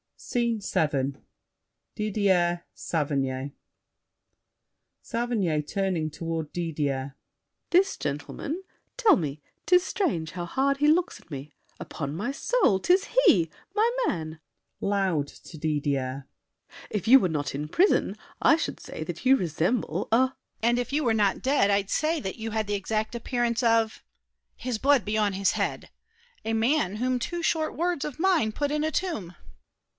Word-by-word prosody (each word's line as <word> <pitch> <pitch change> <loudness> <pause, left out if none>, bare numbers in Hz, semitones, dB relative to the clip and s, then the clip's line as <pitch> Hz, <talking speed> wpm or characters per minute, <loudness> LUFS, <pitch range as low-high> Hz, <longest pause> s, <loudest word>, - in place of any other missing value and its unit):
SCENE 235 -3 -1
VII 140 -7 0 0.8
Didier, 190 -5 +1
Saverny 140 -3 -2 1.5
SAVERNY 225 -10 0
(turning 185 -2 -1
toward 160 0 -4
Didier). 145 -5 -2 0.6
This 380 +2 +4
gentleman? 150 - -4 0.3
Tell 450 -7 +6
me— 150 - -3 0.2
'Tis 360 0 +5
strange 220 - -1
how 175 -1 -4
hard 275 +9 +1
he 295 +1 +3
looks 335 +3 +2
at - - -23
me! 145 0 -7 0.3
Upon 140 -1 -5
my 220 +10 -2
soul, 275 - +2
'tis 365 - +2 0.2
he! 170 - +5 0.3
My 435 +2 +4 0.2
man! 160 -1 -3 0.4
[Loud 190 -7 0
to 160 - -13
Didier.] 140 -3 -1 0.6
If 210 -2 -3
you 265 +4 +9
Were 185 - +1
not 145 -4 -2
in 145 +2 -3
prison, 365 - +2 0.3
I - - +6
should 330 - -3
say - - -7
that - - -7
you 265 +1 +7
Resemble 175 - -1
a— 225 - +6
DIDIER. 260 0 +2 0.3
And 240 +1 +3
if 245 +3 -3
you 300 +1 +2
were 235 -4 +2
not 205 -3 +2
dead, 265 -6 +3
I'd 200 0 +1
say 315 +2 +1
That 190 -6 -5
you 225 0 -4
had 220 0 0
the 205 - 0
exact 215 +3 -2
appearance 235 0 0
of— 230 -2 +2 0.5
His 250 -3 -3
blood 275 -1 +4
be 210 +1 -1
on 210 -2 +2
his 195 0 +2
head!—a 460 - -5
man 225 -2 +2
whom 250 +2 0
two 345 +7 -3
Short 315 -1 0
words 345 -2 0
of 300 -1 -6
mine 340 -11 +3
put 290 +5 -2
in 300 0 0
a 315 - 0
tomb. 220 - -3
215 Hz, 150 wpm, -27 LUFS, -, 1.5 s, you